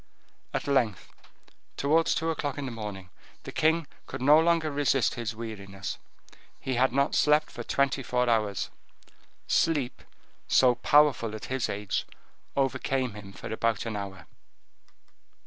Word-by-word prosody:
At - - -2
length, 125 -8 0 0.6
towards 160 +4 +3
two 165 0 0
o'clock 145 -3 -3
in 145 - -3
the 130 - -4
morning, 105 -5 -7 0.3
the - - -7
king 160 +1 +2 0.2
could - - -6
no 145 +5 +6
longer 165 -1 +2
resist 140 -1 +2
his 115 -5 -4
weariness: 100 -4 -6 0.6
he 130 - -3
had 130 +1 +3
not 140 +3 +1
slept 150 +1 +3
for - - -7
twenty 140 +3 +1
four 125 0 0
hours. 105 -5 0 0.7
Sleep, 145 -7 +1 0.5
so 125 -1 +5
powerful 125 -3 +3
at 110 - -7
his 130 -2 0
age, 100 0 -2 0.5
overcame 130 -2 0
him 100 -1 -10
for 110 - -7
about 115 -1 0
an 115 -2 -3
hour. 95 -4 -6
125 Hz, 140 wpm, -28 LUFS, 110-145 Hz, 0.7 s, no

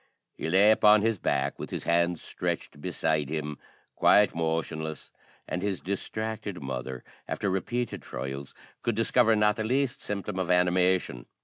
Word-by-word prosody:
He 80 - -4
lay 100 +5 +6
upon 105 -1 +6
his 115 -3 +1
back, 70 -2 0
with - - -5
his - - -4
hands 85 0 +1
stretched 75 - -4
beside 80 -4 0
him, 75 -1 -4 0.4
quite 105 -1 +5
motionless; 80 -2 -3 0.4
and 90 - -3
his 100 -2 -1
distracted 105 +1 -4
mother, 65 -1 -5 0.2
after 100 - -1
repeated 120 +5 -2
trials, 70 +1 -6 0.3
could 120 - 0
discover 115 0 +3
not 105 0 +3
the 110 - -1
least 130 +3 0
symptom 100 -1 -4
of 90 - -2
animation. 90 -7 +2
90 Hz, 145 wpm, -28 LUFS, 80-105 Hz, 0.4 s, lay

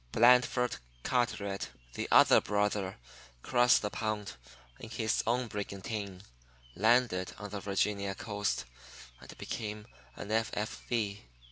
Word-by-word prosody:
Blandford 125 +1 +4 0.3
Carteret, 100 -5 -1 0.2
the - - -3
other - - +7
brother, 105 -1 0 0.5
crossed 120 -2 +4
the 105 - -2
pond 110 -2 -3 0.5
in 115 - -9
his 110 -1 0
own 125 +2 +2
brigantine, 100 -2 -5 0.5
landed 110 -3 +2
on 105 -1 -7
the 105 - -4
Virginia 100 0 -1
coast, 105 - -2 0.5
and - - -12
became 105 -1 -5 0.3
an 100 - -7
F.F. 110 -1 -1
105 Hz, 110 wpm, -31 LUFS, 100-115 Hz, 0.5 s, other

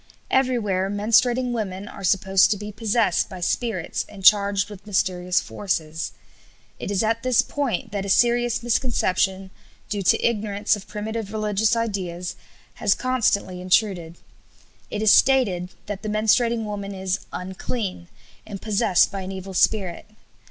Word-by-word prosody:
Everywhere 215 -8 +1
menstruating 235 +5 +2
women 205 -4 -4
are 195 - -10
supposed 190 0 +3
to 210 - +1
be 210 +1 -7
possessed 215 -3 +1
by 185 - -8
spirits 185 0 -2
and 195 -2 -10
charged 200 -1 +5
with 205 0 -12
mysterious 180 -3 +1
forces. 160 -6 -3 0.7
It - - -5
is 200 +1 +1
at 225 +1 0
this 255 -1 +3
point 270 -5 -3
that 200 -1 -2
a 200 - -5
serious 240 +2 +2
misconception, 195 -6 0 0.4
due 205 -2 -2
to 185 - +2
ignorance 210 -2 0
of 205 - -11
primitive 215 0 -5
religious 215 0 +1
ideas, 180 -6 -3 0.5
has 200 - +3
constantly 210 -8 0
intruded. 180 -3 +1 0.7
It 210 - -3
is 215 - +6
stated 210 -10 +3 0.2
that 205 -1 -5
the 215 - -4
menstruating 220 +2 +2
woman 200 -2 -5
is 190 0 -2
"unclean" 185 0 -5 0.4
and 200 -2 -8
possessed 210 -3 +2
by 195 -1 -4
an 190 0 -6
evil 190 0 -7
spirit. 185 -2 +1
205 Hz, 145 wpm, -23 LUFS, 190-225 Hz, 0.7 s, is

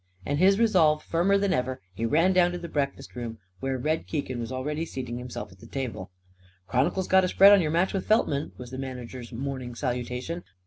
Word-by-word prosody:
And, 145 +5 -1
his 195 +2 +5
resolve 175 -9 +4
firmer 180 +4 +2
than 200 -1 +1
ever, 130 0 -1
he 115 +5 -2
ran 165 +9 +3
down 175 -1 +4
to - - -3
the 170 -1 -6
breakfast 140 -6 -3
room, 115 -2 -5 0.2
where 135 +3 -2
Red 155 +5 -1
Keegan 135 -5 -3
was 115 +1 -4
already 150 +5 -2
seating 125 -6 -5
himself 125 -6 -7
at 90 - -17
the - - -13
table. 125 -9 -5 0.6
"Chron'cle's 145 - +1
got 190 0 +5
a - - +2
spread 195 +2 +7
on 200 -2 +7
your 155 - 0
match 170 +4 +1
with 195 - -2
Feltman!" 155 -10 +2
was 125 -1 -9
the 130 - -6
manager's 125 -2 -7
morning 130 0 -5
salutation. 125 +6 -3
140 Hz, 210 wpm, -27 LUFS, 125-175 Hz, 0.6 s, spread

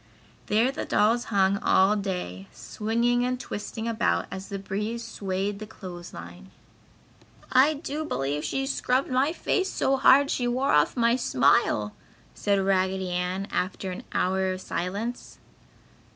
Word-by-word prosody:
There 225 +5 +3
the - - -4
dolls 230 +3 +2
hung 200 -1 +2
all 195 +1 +4
day, 180 - -4
swinging 235 +3 0
and 250 0 -1
twisting 220 -1 -5
about 230 0 +1
as 190 0 -7
the 200 - -4
breeze 210 +4 -4
swayed 200 -2 -3
the 215 - -7
clothes 175 -4 -9
line. 90 +2 -11 1.0
"I 275 +4 +5
do 300 +1 -4
believe 145 - -2
she 270 - -1
scrubbed 265 -1 0
my 265 +4 +2
face 380 +2 0
so 270 -6 +1
hard 275 +1 +5
she 245 - 0
wore 255 +3 +1
off 150 - +3
my 235 0 +3
smile!" 125 - +2 0.4
said 200 -1 +1
Raggedy 190 -1 0
Ann, 180 +2 -2
after 185 +1 -2
an 180 - -6
hour 190 +1 +1
of 185 - -7
silence. 200 +9 -4
205 Hz, 145 wpm, -26 LUFS, 185-245 Hz, 1.0 s, I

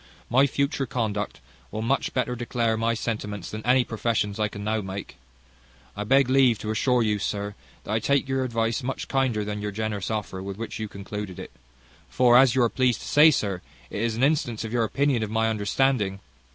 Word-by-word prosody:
My 135 +3 +5
future 140 0 -1
conduct 105 -4 -2 0.3
will 110 - -4
much 135 +4 0
better 125 -1 -1
declare 120 -1 0
my 115 +1 0
sentiments 105 -5 -4
than 110 0 -6
any 125 +1 +4
professions 110 -3 -1
I 105 - +2
can 100 0 -8
now 110 +1 0
make. 95 0 -7 0.8
I 105 - -3
beg 135 +3 +4
leave 130 -3 +4
to 110 +1 -4
assure 125 +2 +2
you, 105 -1 +1
sir, 100 +1 -3 0.3
that - - -6
I 110 - +2
take 140 +3 +1
your 135 0 0
advice 115 0 -1
much 130 +1 -4
kinder 125 -6 0
than 105 0 -4
your 105 - -2
generous 105 -1 -3
offer 105 -4 -3
with 95 0 -6
which 115 0 -5
you 110 - -3
concluded 100 -1 -7
it; - - -8 0.6
for, 125 -1 +4
as 130 -1 +6
you 130 - +4
are 115 - +3
pleased 125 -2 +1
to - - -8
say, 150 +2 +7
sir, 100 - -1 0.3
it 105 - -3
is 115 -1 0
an 120 - -1
instance 135 -7 +1
of 110 0 -5
your 115 -2 +2
opinion 140 +1 +1
of 110 - -2
my 110 +1 +1
understanding." 105 -1 +1
115 Hz, 205 wpm, -25 LUFS, 105-125 Hz, 0.8 s, say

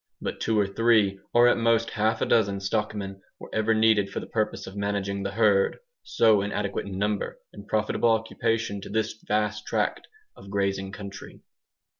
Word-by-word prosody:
But - - -4
two 110 -1 +1
or 100 - +3
three, 100 -1 +2
or 120 +1 +6
at 120 - +3
most 115 0 +2
half 110 +1 0
a - - +2
dozen, 100 -4 +2
stockmen 100 -1 -3 0.2
were - - -11
ever 110 0 +2
needed 110 -2 +3
for - - -4
the - - -7
purpose 110 -1 -2
of 95 - -10
managing 100 -1 -2
the 100 - -2
herd, 100 -2 +3 0.2
so 110 -3 +3
inadequate 100 0 -3
in 95 -1 -5
number 105 +1 -1 0.2
and 100 0 -11
profitable 110 +2 +1
occupation 115 -2 0
to - - -9
this 110 +1 -1
vast 105 0 -1
tract - - -1 0.3
of 100 - -13
grazing 95 -1 -1
country. 100 -1 -9
105 Hz, 175 wpm, -26 LUFS, 100-110 Hz, 0.3 s, or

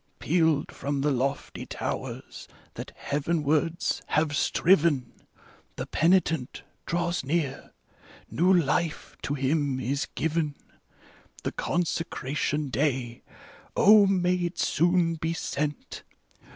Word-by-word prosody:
Pealed 160 -3 +1
from 140 0 -3
the 145 +1 +2
lofty 135 +2 -2
towers - - -5 0.3
that - - -7
heavenwards 155 +4 0
have 150 -1 +1
striven: 155 -7 +3 0.6
The - - -4
penitent 165 -5 +1 0.2
draws 175 -1 -1
near, 140 -1 -2 0.6
new 180 +3 +2
life 170 -1 +1
to 145 - -2
him 140 0 0
is 135 +3 -1
given. 160 -2 -1 0.9
The - - -1
consecration 150 -4 -2
day 125 -3 -1 0.3
— - - -19
0, 205 0 +7
may 180 -2 +2
it 175 0 -3
soon 170 0 +2
be 160 +2 -2
sent 150 -2 -4
155 Hz, 105 wpm, -27 LUFS, 140-170 Hz, 0.9 s, 0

